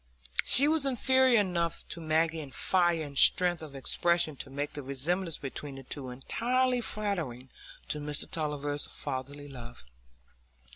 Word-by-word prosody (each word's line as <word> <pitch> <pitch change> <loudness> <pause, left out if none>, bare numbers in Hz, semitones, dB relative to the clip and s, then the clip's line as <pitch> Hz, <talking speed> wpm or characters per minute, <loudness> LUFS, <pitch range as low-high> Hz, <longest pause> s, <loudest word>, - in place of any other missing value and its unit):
She 280 +3 +6
was 310 -2 +2
inferior 260 -1 +3
enough 170 -4 -2
to 170 - -6
Maggie 160 +1 +1
in 145 -3 -7
fire 175 +4 +1
and 145 -2 -9
strength 175 +4 +6
of 150 -3 -10
expression 170 +3 +2
to 135 - -7
make 145 +2 -4
the 145 - -6
resemblance 160 +6 -3
between 140 +1 -7
the 135 - -10
two 130 0 -5
entirely 245 - 0
flattering 170 - -3 0.4
to 150 - +1
Mr 150 0 -4
Tulliver's 145 -2 -3
fatherly 140 +1 -5
love. 120 - -10
155 Hz, 145 wpm, -29 LUFS, 140-180 Hz, 0.4 s, She